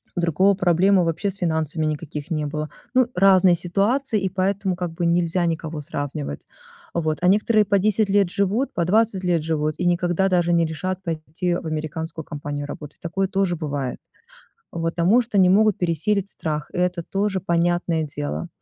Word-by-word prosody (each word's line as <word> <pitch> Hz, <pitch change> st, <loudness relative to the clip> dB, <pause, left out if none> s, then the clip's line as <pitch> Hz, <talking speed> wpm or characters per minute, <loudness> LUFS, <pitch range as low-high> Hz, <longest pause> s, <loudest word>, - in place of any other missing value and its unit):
у -, -, -1 dB
другого 180 Hz, +4 st, +3 dB
проблемы 185 Hz, +1 st, +3 dB
вообще 165 Hz, +5 st, -1 dB
с -, -, -3 dB
финансами 160 Hz, -3 st, -1 dB
никаких 150 Hz, 0 st, -4 dB
не 155 Hz, -2 st, -1 dB
было. 150 Hz, +1 st, -4 dB, 0.2 s
Ну, 255 Hz, -1 st, +4 dB
разные 185 Hz, -1 st, +5 dB
ситуации, 205 Hz, +8 st, 0 dB
и 190 Hz, -, 0 dB
поэтому, 190 Hz, 0 st, -1 dB
как 175 Hz, -1 st, -4 dB
бы, 170 Hz, +1 st, -3 dB
нельзя 170 Hz, +1 st, +1 dB
никого 160 Hz, -2 st, -3 dB
сравнивать. 135 Hz, -, -5 dB, 0.5 s
Вот, 155 Hz, -2 st, -1 dB
а 180 Hz, -, +2 dB
некоторые 210 Hz, +2 st, +4 dB
по 200 Hz, 0 st, +2 dB
10 210 Hz, +1 st, +1 dB
лет 200 Hz, -2 st, +3 dB
живут, 200 Hz, +7 st, 0 dB
по 170 Hz, -, 0 dB
20 205 Hz, 0 st, +2 dB
лет 170 Hz, -3 st, +1 dB
живут 155 Hz, -1 st, -1 dB
и 180 Hz, -, -2 dB
никогда 175 Hz, +2 st, +1 dB
даже 175 Hz, -2 st, +2 dB
не 170 Hz, -1 st, +3 dB
решат 185 Hz, +4 st, -4 dB
пойти 165 Hz, +1 st, -2 dB
в 175 Hz, -, -5 dB
американскую 160 Hz, +1 st, -4 dB
компанию 145 Hz, -1 st, -5 dB
работать. 150 Hz, 0 st, -9 dB
Такое 190 Hz, +3 st, -1 dB
тоже 195 Hz, -2 st, 0 dB
бывает, 145 Hz, -5 st, -4 dB, 0.7 s
в 170 Hz, -, -4 dB
потому 170 Hz, +7 st, +3 dB
что 235 Hz, -3 st, -5 dB
не 185 Hz, -1 st, +6 dB
могут 215 Hz, +1 st, +4 dB
пересилить 185 Hz, +4 st, 0 dB
страх. 150 Hz, -2 st, -4 dB
И -, -, -7 dB
это 180 Hz, -1 st, 0 dB
тоже, 195 Hz, +2 st, -1 dB
понятное 170 Hz, -2 st, 0 dB
дело. 145 Hz, +3 st, -4 dB
175 Hz, 175 wpm, -22 LUFS, 160-195 Hz, 0.7 s, не